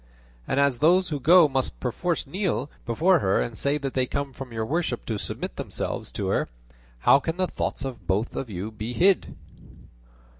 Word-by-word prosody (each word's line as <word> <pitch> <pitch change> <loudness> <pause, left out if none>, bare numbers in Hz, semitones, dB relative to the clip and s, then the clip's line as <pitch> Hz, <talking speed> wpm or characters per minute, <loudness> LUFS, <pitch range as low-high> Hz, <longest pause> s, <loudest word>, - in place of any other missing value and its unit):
And 135 - +1
as 140 -4 +2
those 180 +5 +4
who 150 -3 -2
go 170 +4 +7
must 135 -2 -1
perforce 165 +8 -1
kneel 175 - -2 0.2
before 165 +10 +3
her 95 -7 +2
and 115 - -2
say 140 +5 +1
they 135 -3 -1
come 140 0 -3
from 130 -1 -8
your 110 -1 -2
worship 150 -2 -1
to 110 -3 -3
submit - - -5
themselves - - -4
to - - -3
her, - - 0 0.5
how 140 - +6
can 165 +3 -3
the 185 - +2
thoughts 155 - -3
of 130 -3 -7
both 100 +4 0
of 130 - -4
you 100 +2 -5
be 110 +2 -5
hid?" 185 +5 +2
135 Hz, 185 wpm, -25 LUFS, 120-165 Hz, 0.5 s, go